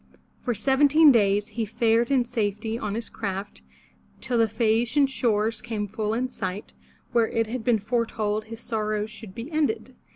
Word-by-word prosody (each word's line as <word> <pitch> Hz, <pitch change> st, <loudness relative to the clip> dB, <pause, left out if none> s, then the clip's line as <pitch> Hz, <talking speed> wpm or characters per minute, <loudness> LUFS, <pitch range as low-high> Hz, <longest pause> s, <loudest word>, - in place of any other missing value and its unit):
For 240 Hz, -3 st, -1 dB
seventeen 285 Hz, +6 st, +5 dB
days 205 Hz, -3 st, +2 dB
he 230 Hz, -, -3 dB
fared 230 Hz, +1 st, +1 dB
in 260 Hz, -3 st, +3 dB
safety 220 Hz, -1 st, -2 dB
on 210 Hz, -3 st, -3 dB
his 230 Hz, 0 st, -3 dB
craft, 195 Hz, -1 st, -5 dB, 0.6 s
till 245 Hz, -2 st, -1 dB
the 225 Hz, -, +5 dB
Phae 220 Hz, +1 st, +2 dB
a'ci 240 Hz, +4 st, -3 dB
an -, -, +6 dB
shores 225 Hz, -4 st, 0 dB
came 210 Hz, -2 st, -3 dB
full 215 Hz, +1 st, -2 dB
in 250 Hz, +2 st, 0 dB
sight, 200 Hz, -5 st, -5 dB, 0.4 s
where 230 Hz, -2 st, +3 dB
it 225 Hz, 0 st, 0 dB
had 230 Hz, +1 st, -5 dB
been 240 Hz, -2 st, +3 dB
foretold 215 Hz, -1 st, -1 dB
his 225 Hz, +1 st, -9 dB
sorrows 215 Hz, -2 st, -2 dB
should 215 Hz, -3 st, -10 dB
be 245 Hz, +7 st, -7 dB
ended. 310 Hz, +7 st, -1 dB
225 Hz, 175 wpm, -25 LUFS, 215-240 Hz, 0.6 s, an